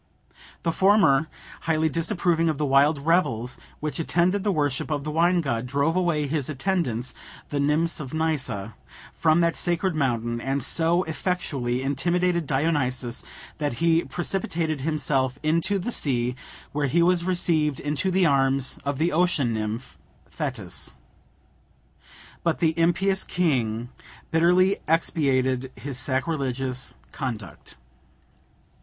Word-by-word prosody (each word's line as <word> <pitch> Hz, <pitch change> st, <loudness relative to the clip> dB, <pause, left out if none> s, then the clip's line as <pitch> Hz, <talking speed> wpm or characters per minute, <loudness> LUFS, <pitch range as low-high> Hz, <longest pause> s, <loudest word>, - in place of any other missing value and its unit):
The 165 Hz, -, +1 dB
former, 165 Hz, -6 st, +4 dB, 0.4 s
highly 160 Hz, 0 st, +3 dB
disapproving 165 Hz, 0 st, +1 dB
of 155 Hz, -, -1 dB
the 150 Hz, -, 0 dB
wild 140 Hz, +1 st, +3 dB
revels 130 Hz, -8 st, +1 dB, 0.2 s
which 150 Hz, +2 st, -3 dB
attended 175 Hz, +4 st, +1 dB
the 205 Hz, -, +1 dB
worship 145 Hz, -5 st, -1 dB
of 145 Hz, -2 st, -1 dB
the 155 Hz, -, -3 dB
wine 170 Hz, +3 st, +3 dB
god, 125 Hz, -5 st, -2 dB
drove 140 Hz, +5 st, +1 dB
away 170 Hz, -5 st, +1 dB
his 145 Hz, -1 st, -2 dB
attendants, 135 Hz, -, -1 dB, 0.4 s
the 145 Hz, -, -2 dB
nymphs 150 Hz, +4 st, +1 dB
of 145 Hz, -4 st, -5 dB
Nysa, 130 Hz, -10 st, -1 dB, 0.4 s
from 160 Hz, +1 st, +3 dB
that 170 Hz, -1 st, +2 dB
sacred 175 Hz, +1 st, 0 dB
mountain, 120 Hz, -5 st, -1 dB
and 135 Hz, +1 st, -1 dB
so 170 Hz, +5 st, +2 dB
effectually 145 Hz, -8 st, -2 dB
intimidated 170 Hz, +4 st, 0 dB
Dionysus, 135 Hz, -4 st, 0 dB, 0.4 s
that 145 Hz, -4 st, -1 dB
he 165 Hz, +5 st, +2 dB
precipitated 170 Hz, -4 st, -2 dB
himself 140 Hz, -3 st, 0 dB
into 170 Hz, +6 st, +1 dB
the 195 Hz, +6 st, -3 dB
sea, 125 Hz, -, 0 dB, 0.4 s
where 145 Hz, 0 st, 0 dB
he 170 Hz, +6 st, +3 dB
was 175 Hz, 0 st, +3 dB
received 165 Hz, -5 st, +1 dB
into 150 Hz, +5 st, -1 dB
the 185 Hz, 0 st, +3 dB
arms 135 Hz, -2 st, +1 dB
of 140 Hz, -1 st, -2 dB
the 165 Hz, +4 st, +1 dB
ocean 155 Hz, -8 st, +2 dB
nymph, 110 Hz, +3 st, -4 dB, 0.3 s
Thetis. -, -, -3 dB, 1.5 s
But 165 Hz, -2 st, +1 dB
the 160 Hz, -2 st, +2 dB
impious 190 Hz, +4 st, +2 dB
king 120 Hz, -9 st, 0 dB, 0.4 s
bitterly 180 Hz, +4 st, +4 dB
expiated 130 Hz, -5 st, +1 dB
his 135 Hz, -2 st, -5 dB
sacrilegious 130 Hz, -2 st, -2 dB, 0.2 s
conduct. 110 Hz, -, -6 dB
150 Hz, 125 wpm, -25 LUFS, 130-170 Hz, 1.5 s, former